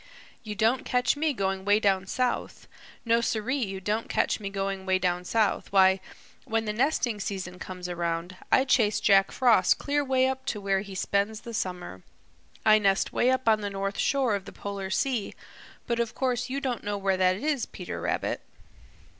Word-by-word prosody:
You 210 -2 -6
don't 225 +5 +2
catch 250 +2 +1
me 305 +1 +1
going 195 -6 -2
'way 205 +2 +4
down 195 -2 +1
south. 250 +4 -2 0.4
No, 230 0 +3
siree, 235 +4 -1
you 195 -2 -4
don't 210 +4 -2
catch - - +1
me 200 -2 -4
going 195 -1 -3
'way 190 0 +2
down 180 -1 -1
south. 215 0 0
Why, 190 -1 +5 0.4
when 225 0 -1
the 210 - -2
nesting 245 -2 0
season 185 -3 -5
comes 180 -1 -6
around, 170 0 -3 0.2
I 260 - +5
chase 225 -5 +3
Jack 195 -1 +4
Frost 245 -3 +4
clear 290 0 0
'way 260 -1 +2
up 265 0 -2
to 210 - -2
where 195 -1 0
he 200 -1 -9
spends 200 +3 -1
the 235 - -8
summer. 180 - -4 0.6
I 215 0 +7
nest 195 -2 +1
'way 245 - +3
up 260 -1 0
on 215 -1 +4
the 195 -1 -3
shore 270 -5 +1
of 200 -2 -2
the - - -9
Polar 200 -1 -5
Sea, 235 +2 -1 0.5
but 235 -1 -1
of 235 -1 -1
course 250 -1 -1
you 270 +2 -2
don't 255 -4 -3
know 205 0 -2
where 195 -1 0
that 185 0 +3
is, 285 +4 -1
Peter - - -7
Rabbit." - - -2
210 Hz, 190 wpm, -27 LUFS, 195-245 Hz, 0.6 s, I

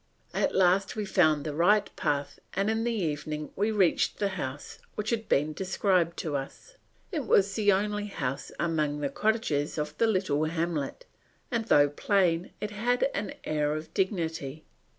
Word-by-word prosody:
At - - 0
last 190 +1 +3
we 215 -1 -2
found 155 -6 +3
the 150 - -3
right 200 +6 +3
path 145 -1 -1 0.2
and 200 +3 +1
in 225 +1 0
the 240 - +1
evening 155 -6 -3
we 205 +3 +1
reached 195 -6 +2
the 200 - 0
house, 145 -7 -6 0.2
which 210 +2 -2
had 225 -2 -2
been 150 +2 +2
described 185 -2 +1
to 155 -3 -3
us. 140 - -6 0.4
It 305 -8 -3
was 195 0 +4
the 205 -1 +3
only 210 +1 0
house 135 -9 -4
among 150 -3 0
the 140 - 0
cottages 155 -6 0
of 150 0 -3
the 230 - +4
little 185 -8 +1
hamlet, 165 - -2 0.5
and 230 -2 0
though 145 -9 +5
plain 175 +2 +1
it 210 - -4
had 245 +6 +1
an 200 +1 -3
air 150 -1 0
of 155 +1 -7
dignity. 165 -6 -2
180 Hz, 170 wpm, -28 LUFS, 150-210 Hz, 0.5 s, though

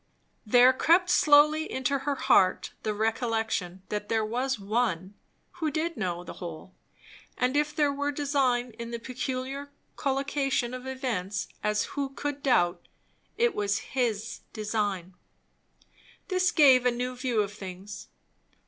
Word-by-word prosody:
There 245 +4 +7
crept 350 +6 +3
slowly 300 +1 +5
into 260 +2 0
her 280 +1 -1
heart 185 -7 +3
the 215 - -1
recollection 220 -4 -1
that 210 0 -4
there 220 -1 +1
was 250 +4 -1
One 200 -3 -1 0.5
who 315 - +1
did 330 +2 -2
know 175 -5 -3
the - - -8
whole; 175 +1 -8 0.6
and 255 +2 +1
if 295 0 +1
there 290 -2 +2
were 285 +1 -1
design 270 -4 0
in 235 0 -5
the 235 - -4
peculiar 260 +3 -4 0.3
collocation 275 -2 0
of 255 +1 -7
events, 220 -8 -3
as 210 0 +1
who 280 -1 -2
could 285 +1 -4
doubt, 175 -10 +2 0.5
it 475 0 +3
was 205 0 -2
His 225 -4 -1
design. 205 -4 -2 1.2
This 370 -1 +2
gave 265 -5 +6
a - - +6
new 250 +1 -3
view 245 -3 0
of 200 0 -7
things. 195 0 -8
245 Hz, 140 wpm, -28 LUFS, 210-280 Hz, 1.2 s, There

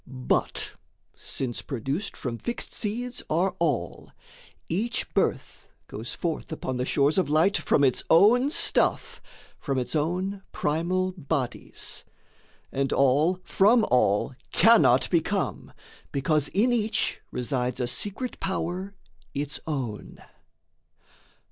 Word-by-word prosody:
But, 130 -2 -1 0.4
since 125 -3 -4
produced 135 - -3
from 120 -3 -4
fixed 240 - -4
seeds 240 +3 -3
are 180 +4 +1
all, 150 -8 -1 0.6
Each 215 +8 -1
birth - - -1 0.2
goes 110 +3 -6
forth 165 -2 -3
upon 130 -5 -3
the 125 - -1
shores 145 +5 +2
of 180 - 0
light 160 +7 +3
From 145 - +2
its 130 -3 +2
own 225 - +6
stuff, 315 - +2 0.4
from 135 -3 -2
its 125 +1 -2
own 185 +6 -1
primal 175 +5 0
bodies. 145 -7 -3 0.7
And 135 0 -1
all 145 +7 +3
from 220 +4 +4
all 115 0 +2 0.2
cannot 220 - +5
become, 180 +3 -1 0.4
because 145 +1 +1
In 235 +6 +2
each 225 -2 0
resides 125 -1 -2
a 125 - 0
secret 205 - -3
power 190 +1 -3 0.4
its 145 0 -2
own. 130 -9 -4
160 Hz, 115 wpm, -26 LUFS, 135-195 Hz, 0.7 s, own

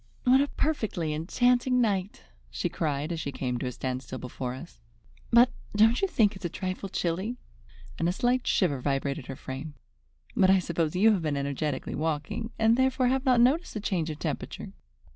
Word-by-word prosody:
"What 260 +1 +5
a 285 - +1
perfectly 215 - -1
enchanting 245 +10 +2
night!" 200 -4 0 0.3
she - - -2
cried, 150 0 -2
as 165 - -2
she 140 -2 -3
came 125 -2 -3
to 130 - -3
a - - -2
standstill 130 +1 -4
before 125 0 -5
us. 145 -3 -12 0.5
"But 240 +1 +6 0.2
don't 225 +3 +4
you 390 - +3
think 215 - +2
it 190 - -11
is - - -6
a - - 0
trifle 185 +2 -4
chilly?" 185 +7 -2 0.6
and 165 - +2
a - - +2
slight 245 +6 0
shiver 145 -9 +2
vibrated 140 0 -2
her 135 - -5
frame. 135 +4 -7 0.6
"But 185 - +4
I 190 - +6
suppose 170 -2 -1
you 215 +5 +5
have 200 -5 +1
been 150 -3 -1
energetically 140 0 -2
walking, 160 +8 -2
and 225 +1 +4
therefore 260 -1 +2
have 265 +1 0
not 250 -2 +5
noticed 285 +7 +2
the - - -1
change 180 -5 -1
of 155 - -5
temperature. - - -5
180 Hz, 190 wpm, -28 LUFS, 145-235 Hz, 0.6 s, But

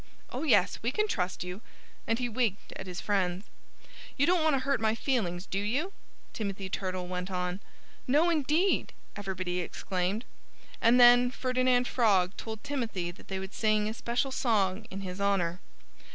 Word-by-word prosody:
"Oh, - - -4
yes! 235 - +3
We 230 - 0
can 425 +9 +1
trust 185 - -2
you!" 180 +3 -6 0.5
And 225 - +2
he 245 0 -1
winked 230 -4 -1
at - - -7
his 180 0 -5
friends. 190 -1 0 0.7
"You 280 - +4
don't 355 0 +3
want 315 -2 +4
to 265 - 0
hurt 275 -3 +1
my 220 0 +2
feelings, 200 -9 -1
do 195 - -2
you?" 270 - -1 0.4
Timothy 200 -3 -4
Turtle 185 -1 -3
went 180 +1 -4
on. 180 0 -2 0.5
"No, 305 +7 +4
indeed!" 320 +5 +1 0.2
everybody 185 -3 -3
exclaimed. 185 +5 -2 0.6
And 235 +2 +5
then 245 0 +8
Ferdinand 255 -1 +1
Frog 200 -6 +3
told 220 -1 -7
Timothy 230 -11 -2
that 175 - -17
they 190 - -3
would 190 +1 -6
sing 215 -1 +2
a 215 - -2
special 240 +4 -1
song 215 -5 +1
in 195 -1 -6
his 185 0 -6
honor. 185 -3 +1
215 Hz, 165 wpm, -30 LUFS, 185-250 Hz, 0.7 s, then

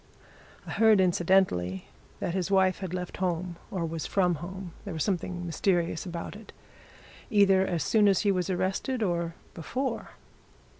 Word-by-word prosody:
I - - -7
heard, 220 -2 +5
incidentally, 175 - +2 0.3
that 170 - -2
his 185 -1 -1
wife 190 -1 +3
had 190 -3 -5
left 180 -1 -4
home, 175 -1 -2
or 175 -3 -2
was 165 -1 -4
from 180 -3 +2
home 190 0 -7
there 195 -5 -6
was 160 - 0
something 180 -2 -2
mysterious 170 0 0
about 170 +2 -5
it 215 0 -12 0.8
either 195 -3 +5
as 170 -2 -1
soon 215 -2 +4
as 195 -2 +4
he 205 - +3
was 185 -1 -1
arrested 190 +7 -1
or 170 -3 -1 0.2
before. 255 - -3
185 Hz, 155 wpm, -28 LUFS, 170-195 Hz, 0.8 s, heard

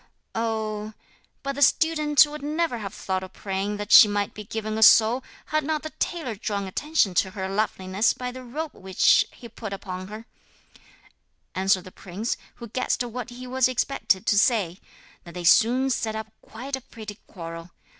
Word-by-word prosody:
'Oh, 220 -1 -2 0.5
but 275 0 -2
the 285 - -6
student 305 0 +5
would 300 0 -8
never 300 -3 -1
have 200 -3 -5
thought 190 -1 -2
of 185 0 -9
praying 195 +1 -3
that 205 +1 -6
she 215 - +10
might 205 0 -1
be 210 - -8
given 215 +1 -4
a - - -3
soul 225 +4 +6 0.3
had 310 0 +2
not 305 +1 -1
the 310 - -6
tailor 320 -9 -3
drawn 200 -1 -3
attention 255 - +1
to 190 +2 +2
her 190 0 -4
loveliness 195 0 0
by 250 0 -5
the 255 +1 -9
robe 295 +6 -5
which 190 -1 +3
he 240 - -12
put 215 -2 -7
upon 185 -1 -6
her,' 215 +3 -9 1.3
answered 190 -1 +2
the 185 - -11
prince, 200 +6 -4 0.2
who 235 - -9
guessed 255 +2 -1
what 245 +1 -6
he 250 +1 -9
was 255 0 +2
expected 250 -6 0
to 205 - +4
say: 200 -7 +2 0.4
and 170 - -12
they 180 - -5
soon 245 +9 +4
set 220 -2 -1
up 220 0 -6
quite 260 +5 -6
a 265 - -8
pretty 220 -3 -10
quarrel. 165 -1 -8
220 Hz, 180 wpm, -25 LUFS, 195-255 Hz, 1.3 s, she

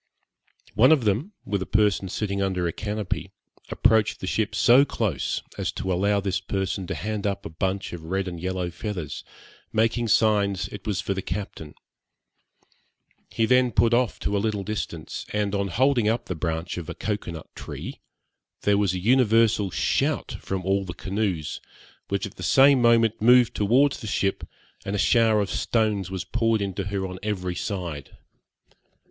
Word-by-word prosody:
One 130 +6 +5
of 150 -6 +4
them, 115 - 0
with 100 -1 -1
a - - -4
person 105 -2 +2
sitting 100 0 -2
under 95 -3 0
a 85 - -3
canopy, 105 -2 -3 0.4
approached 110 -2 +2
the - - -5
ship 105 +2 -1
so 125 +6 +6
close, 105 - -2 0.2
as - - -1
to 95 - -2
allow 100 +3 +2
this 95 -1 -1
person 95 -1 -3
to - - -3
hand 105 0 -3
up 100 0 -3
a - - -6
bunch 95 +4 -2
of 85 - -6
red 95 +3 -2
and 85 -2 -5
yellow 90 0 -2
feathers, 90 -5 -5 0.5
making 115 +2 +1
signs 100 -3 +2
it 100 -1 -9
was 100 -2 0
for 100 - -2
the 95 - -3
captain. 85 -4 -6 1.5
He 115 - +1
then 125 +1 +4
put 115 0 +3
off 120 -1 +2
to 100 - -1
a - - +2
little 105 -2 -1
distance, 85 -6 -5
and, 105 -1 0
on 100 -1 0
holding 120 +3 +2
up 115 +2 -1
the - - -3
branch 80 +1 -3
of 85 - -8
a - - -5
cocoa 105 -4 -3
nut 80 - -10
tree, - - -7 0.6
there 100 0 +3
was 95 -3 +1
an 90 - -3
universal 115 -4 +3
shout - - 0
from 95 -2 -4
all 100 +1 +1
the 90 -2 -7
canoes, 95 -6 -2 0.5
which 100 0 -1
at 100 +3 -10
the - - -9
same 135 -1 +5
moment 115 -2 +3
moved 125 +1 +6
towards 130 +7 +3
the 110 - -7
ship, 100 -2 -1 0.4
and 100 - -3
a - - 0
shower 110 0 +4
of 100 - -2
stones 105 -5 0
was 95 -1 -4
poured 115 -2 +1
into 100 -1 -3
her 100 -1 -2
on 90 0 -6
every 95 -4 -2
side. 85 -8 -5
100 Hz, 175 wpm, -25 LUFS, 95-110 Hz, 1.5 s, so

